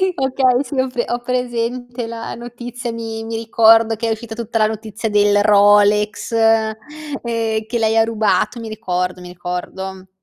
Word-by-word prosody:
Okay, 265 -1 +2
sì 280 -1 -6
ho 260 - +2
pre 245 -2 -2
ho 240 0 -1
presente 245 -1 -3
la 230 0 -6
notizia, 240 0 -7
mi 225 -1 -5
mi 225 0 -5
ricordo 225 0 +4
che 230 +1 -3
è - - 0
uscita 220 0 -5
tutta 230 0 -3
la 215 - +4
notizia 220 0 -4
del 205 0 +3
Rolex, 205 +1 +4
ehm, 225 -1 +3 0.9
che 235 - -2
lei 220 0 +1
ha 225 - +5
rubato, 220 +1 0
mi 225 - -7
ricordo, 180 -4 -3
mi 180 - -9
ricordo. 185 +2 -6
225 Hz, 165 wpm, -19 LUFS, 210-240 Hz, 0.9 s, ha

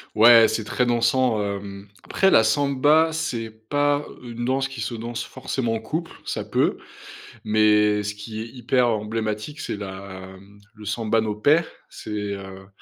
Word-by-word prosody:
Ouais, 115 +1 +8
c'est 110 - -2
très 125 +4 0
dansant, 120 -1 +2
hem. 100 0 -6 0.2
Après 195 - +2
la 110 - +6
samba, 145 +6 +3
c'est 120 -8 -3
pas 145 +6 0 0.2
une 120 -1 -6
danse 135 +2 0
qui 125 -5 -7
se 105 - -3
danse 115 +1 -5
forcément 120 -4 -3
en 110 - -3
co 150 +9 -2
uple. 170 - -14 0.2
Ça - - -3
peut. - - +1 0.7
Mais, 105 -1 +3
ce 105 - -3
qui 110 +1 -8
est 110 - -4
hyper 125 +1 +1
emblématique, 110 +4 -3
c'est - - -4
la, 95 -1 -8
mmh, 100 +1 -18 0.2
le 105 0 -12
samba 110 +1 0
no 110 -1 -2
pé, 145 +10 +3 0.3
c'est, - - -9 0.2
heu, 95 -1 -10
110 Hz, 170 wpm, -23 LUFS, 105-125 Hz, 0.7 s, Ouais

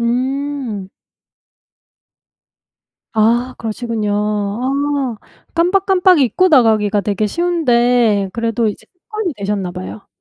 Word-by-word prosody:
음. 255 -3 -2 2.2
아 235 +3 +2
그러시군요. 220 -2 -3
아 240 +6 -1 0.4
깜빡깜빡 365 0 +3
잊고 325 +8 +3
나가기가 220 - +3
되게 205 +1 -1
쉬운데 245 - +2
그래도 230 +1 0
이제 205 - -7
습관이 400 0 -5
되셨나 200 -2 -2
봐요. 185 +3 -8
235 Hz, 210 characters per minute, -17 LUFS, 210-285 Hz, 2.2 s, 깜빡깜빡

